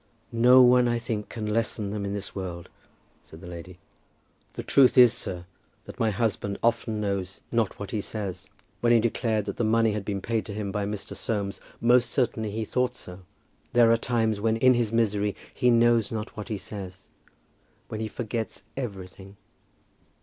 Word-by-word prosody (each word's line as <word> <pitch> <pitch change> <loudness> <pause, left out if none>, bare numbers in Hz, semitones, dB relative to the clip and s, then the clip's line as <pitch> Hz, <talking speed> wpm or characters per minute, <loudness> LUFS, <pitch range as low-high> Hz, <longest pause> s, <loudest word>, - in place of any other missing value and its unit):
"No 125 +2 +7
one, 125 0 +5
I 120 0 +1
think, 115 -3 -4
can 110 -2 -5
lessen 105 -1 -1
them 105 -1 -3
in 100 0 -3
this 100 -1 -6
world," 90 -3 -6 0.5
said 80 - -14
the 90 - -12
lady. 90 +1 -9 0.8
"The - - -6
truth 135 -1 +4
is, 125 -2 +8
sir, 90 -1 -5 0.4
that - - -11
my 115 - +2
husband 105 -2 -1
often 115 -1 +1
knows 100 -2 -3
not 115 -4 0
what 100 - -7
he 110 - -1
says. 100 -4 -5 0.3
When 120 - +2
he 120 - +6
declared 110 -2 0
that - - -5
the - - 0
money 115 0 +3
had 105 -1 -3
been 100 -1 -3
paid 110 +2 -1
to 100 - -6
him 105 -2 -3
by 100 0 -2
Mr. 100 -1 -5
Soames, 100 0 -3 0.2
most 120 0 +4
certainly 115 -4 0
he 110 +2 -3
thought 125 +2 0
so. 90 -5 -9 0.5
There 120 -1 +6
are - - +6
times 115 -3 0
when 110 +1 +1
in 130 +2 +5
his 120 -3 0
misery 105 -3 +1 0.2
he 125 -2 +2
knows 115 -2 +4
not 110 0 -5
what 105 +1 -7
he 110 - -2
says, 95 -2 -9 0.8
when 110 - -5
he 110 - -2
forgets 110 -2 -5
everything." 100 -5 -7
110 Hz, 185 wpm, -26 LUFS, 100-115 Hz, 0.8 s, is